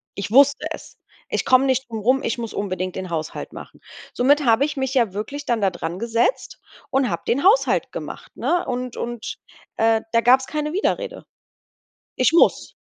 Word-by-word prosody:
Ich 200 +1 -5
wusste 280 +3 +5
es: - - -9 0.3
„Ich - - -1
komme 260 +1 +5
nicht 260 -1 0
drum 225 -2 -4
rum, 255 +6 +2
ich 230 - -1
muss 230 -2 -5
unbedingt 185 -2 -3
den 185 -1 -5
Haushalt 160 -2 -5
machen.“ - - -12 0.3
Somit 285 +3 +3
habe 230 +3 +4
ich 295 0 -2
mich 265 -1 -2
ja 235 -8 +2
wirklich 275 +8 -5
dann 235 -2 0
da 195 - +3
drangesetzt 225 - -2 0.3
und 270 -2 +2
habe - - -3
den 270 +4 +1
Haushalt 415 +7 +3
gemacht, - - -8
ne? 350 0 0
Und 250 -1 -4
und, 240 -1 -5 0.4
äh, 225 0 +2
da 230 - +4
gab's 260 +2 +4
keine 300 0 -3
Widerrede. 425 +6 -2 0.9
Ich 255 +5 +3
muss. 340 - +3
245 Hz, 175 wpm, -22 LUFS, 220-275 Hz, 0.9 s, wusste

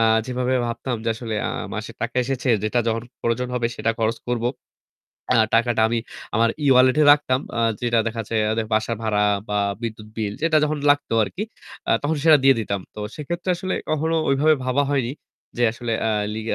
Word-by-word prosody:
আ - - +3 0.2
যেভাবে 125 0 -1
ভাবতাম 120 +1 -3
যে - - 0
আসলে 115 -1 -5
আ - - -2 0.2
মাসে - - -5
টাকা - - -3
এসেছে 130 0 -2 0.2
যেটা 115 +3 +1
যখন 115 0 -1 0.2
প্রয়োজন 120 +2 -1
হবে 120 -1 +1
সেটা 115 - 0
খরচ 115 +1 0
করব। 120 -1 -1 0.9
আ - - +3 0.2
টাকাটা 115 0 +2
আমি 115 0 0 0.4
আমার 115 +1 +3 0.2
e-wallet 130 -1 +5
এ - - +6
রাখতাম 135 -3 +1 0.2
আ - - +1 0.2
যেটা 120 -1 +1
দেখা 115 0 -2
যাচ্ছে 115 +2 -4 0.2
এদের 110 0 -1
বাসা 110 +2 0
ভাড়া 105 -2 +1 0.3
বা 105 - -1 0.3
বিদ্যুৎ 110 -2 -5
বিল 105 -2 -2
যেটা 165 -1 +3
যখন 150 0 -1
লাগতো 145 -4 +1
আরকি 145 - -4 0.5
আ - - +2
তখন 150 +2 0
সেটা 160 -2 +8
দিয়ে 135 -1 +7
দিতাম। 100 -2 -2
তো 105 - -7
সেক্ষেত্রে 175 +5 -3
আসলে 185 +1 -3 0.2
কখনো 160 +1 0
ওইভাবে 150 +3 +4
ভাবা 130 +3 +2
হয়নি 135 -3 0 0.4
যে 120 - 0
আসলে 115 0 -4
আ - - +2 0.2
লি 110 - -4
120 Hz, 190 wpm, -22 LUFS, 115-140 Hz, 0.9 s, সেটা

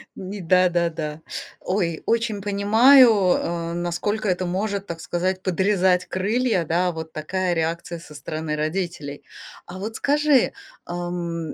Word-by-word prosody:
Ни 195 +1 -7
да-да-да. 170 -3 +1 0.4
Ой, 175 -4 -1
очень 225 -3 0
понимаю, 220 +6 +6 0.3
э, 170 0 -3
насколько 175 +5 -2
это 185 -1 0
может, 200 +2 -2
так 165 -1 -6
сказать, 185 +3 -2
подрезать 185 -1 +2
крылья, 200 +1 0
да, 175 +3 +1
вот 160 -1 -7
такая 180 +4 -1
реакция 170 +1 -2
со 155 - -13
стороны 155 +1 -4
родителей. 155 -2 -3 0.4
А 185 +2 -9
вот 220 +3 -5
скажи, 290 -1 +3 0.3
ам, 175 -2 -4
180 Hz, 125 wpm, -23 LUFS, 170-200 Hz, 0.4 s, понимаю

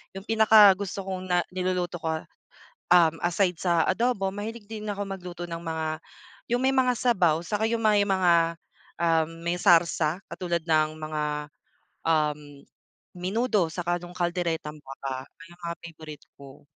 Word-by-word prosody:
'Yong 195 +1 -8
pinakagusto 205 -3 +5
kong 185 -1 -4
na 175 0 +3
niluluto 180 -1 -1
ko, 160 0 -1 0.8
um, 165 -3 +5
aside 180 0 +1
sa 170 -3 +2
adobo, 205 -1 +1
mahilig 215 +2 -6
din 215 -1 -6
ako 205 0 -3
magluto 180 -3 -7
ng 165 - -4
mga 160 -1 -3 0.7
'yong 245 - +1
may 265 - +4
mga 255 -1 +3
sabaw 180 -11 +2
saka 215 +1 -1
'yong 230 0 -1
may 210 -2 +4
mga, 170 -4 +3 0.5
um, 165 -2 +2 0.2
may 175 +1 0
sarsa 170 -1 +3
katulad 175 -2 -2
ng 155 -2 +2
mga, 155 -1 -3 0.9
um, 150 -2 +2 0.8
menudo 200 +1 +1
saka 175 +1 -1
nung 175 0 -10
calderetang 170 -3 -2
baka, 135 -1 -6
mga 170 -1 -9
favorite 155 -3 -10 0.2
ko. 140 -1 -13
175 Hz, 140 wpm, -26 LUFS, 165-195 Hz, 0.9 s, pinakagusto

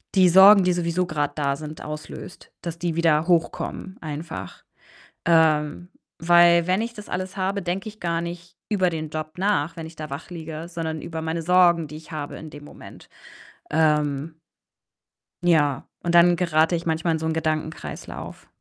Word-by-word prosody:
die 185 -2 +6
Sorgen, 195 +2 +8
die 180 - +3
sowieso 175 +1 0
grad 145 -1 -2
da 140 -2 0
sind, 155 +1 -8
auslöst, 150 +3 -9
dass 170 -1 -6
die 170 -2 -2
wieder 165 -1 +2
hochkommen 180 +2 -1
einfach. 150 - -7 0.6
Ähm, 160 0 +3 0.3
weil 170 0 +6
wenn 185 +2 +2
ich 235 +1 -4
das 210 -2 -10
alles 185 +2 -4
habe, 195 +1 -1
denke 185 +4 -3
ich 215 - -21
gar 170 -1 -1
nicht 170 0 -8
über 185 -3 +2
den 155 -2 -5
Job 155 0 -5
nach, 180 -4 0
wenn 165 -1 -6
ich 160 0 -12
da 155 0 -6
wach 140 +6 -7
liege, 160 -1 -7
sondern 160 -2 -4
über 160 -1 -5
meine 160 +1 -2
Sorgen, 175 -1 +4
die 150 - -9
ich 160 - -13
habe 150 -2 -5
in 160 - -9
dem 145 -1 -11
Moment. - - -13 0.6
Ähm 150 -1 +1 1.1
ja, 145 -5 +3 0.2
und 175 0 0
dann 175 0 +7
gerate 165 -1 +2
ich 170 - -4
manchmal 160 0 0
in 160 - -1
so 160 - -4
'n 160 - 0
Gedankenkreislauf. 155 -1 -4
165 Hz, 175 wpm, -24 LUFS, 155-175 Hz, 1.1 s, Sorgen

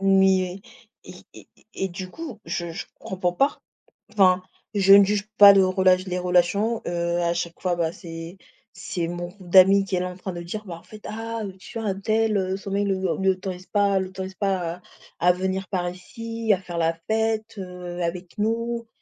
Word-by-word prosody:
Mais 190 -1 +3 0.4
et - - -10 0.2
et - - -14
et - - -27
et 190 - -2
du 185 +1 -7
coup, 290 - -8
je 170 -1 -3
je 170 - -6
comprends 180 -2 -2
pas. 275 +11 +1 0.6
Enfin, 185 -3 +4 0.3
je 195 -1 +6
ne 200 0 +9
juge 205 +1 -1
pas 200 -1 +10
le 195 -1 +5
relat 185 0 +4
les 185 -1 -4
relations, 180 +6 +2
heu, 170 0 -1
à 170 0 +1
chaque 170 -1 -4
fois 180 -2 0
bah, 165 -2 0
c'est 165 +1 -9 0.4
c'est 170 -2 -4
mon 175 0 -4
groupe 180 0 -14
d'amis 195 +2 +7
qui 190 -1 -2
est - - +1
là 180 - -2
en 180 - -10
train 190 0 -5
de 175 - -6
dire: 195 +5 -6
«Bah, 175 -4 -6
en - - -22
fait, 215 -1 -13
ah, 225 +1 -4
heu, 190 - -6
tu 190 - -9
vois 220 -2 -2
untel, 215 +2 +1
heu, 190 0 -1
son 195 0 -8
mec 200 +1 +1
ne 195 - +2
le 190 -2 -1
ne 190 - 0
l'autorise 185 -1 -3
pas 200 -2 +2
l'autorise 190 0 -5
pas 185 -4 -1
à 180 - -18 0.4
à 180 +1 +5
venir 190 +1 -2
par 180 -3 -1
ici, 230 +5 -4
à 190 - -1
faire 175 -2 -7
la 165 0 +2 0.2
fête, 220 0 0
heu, 180 -2 -6
avec 175 +3 -5
nous» 230 +2 -1
190 Hz, 210 wpm, -24 LUFS, 180-205 Hz, 0.6 s, pas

